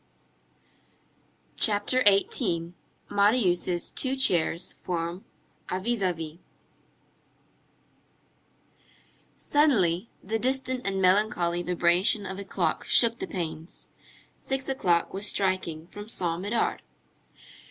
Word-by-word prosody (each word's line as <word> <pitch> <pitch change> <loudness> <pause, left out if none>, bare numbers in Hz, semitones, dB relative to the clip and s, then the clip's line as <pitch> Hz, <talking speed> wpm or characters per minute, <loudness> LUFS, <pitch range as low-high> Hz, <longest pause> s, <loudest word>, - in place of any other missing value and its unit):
CHAPTER 225 +4 +1
XVIII—MARIUS' 185 -1 +1
TWO 265 0 -1
CHAIRS 180 -8 +1
FORM 170 +1 -4 0.4
A 185 - -1
VIS 235 +2 -2
A 185 -1 +2
VIS 160 -2 -7 3.0
Suddenly, 225 - +2
the 225 +4 -2
distant 260 -1 -1
and 195 -1 0
melancholy 180 -3 +2
vibration 180 +4 +2
of 190 +1 -5
a - - -5
clock - - -1
shook 235 -1 +3
the - - -4
panes. 165 -2 -6 0.5
Six 270 0 -3
o'clock 180 -11 +1
was 200 +2 -3
striking 185 -6 -1
from 205 +4 -10
Saint 175 -5 0
Médard. 225 +2 0
190 Hz, 95 wpm, -27 LUFS, 175-225 Hz, 3.0 s, shook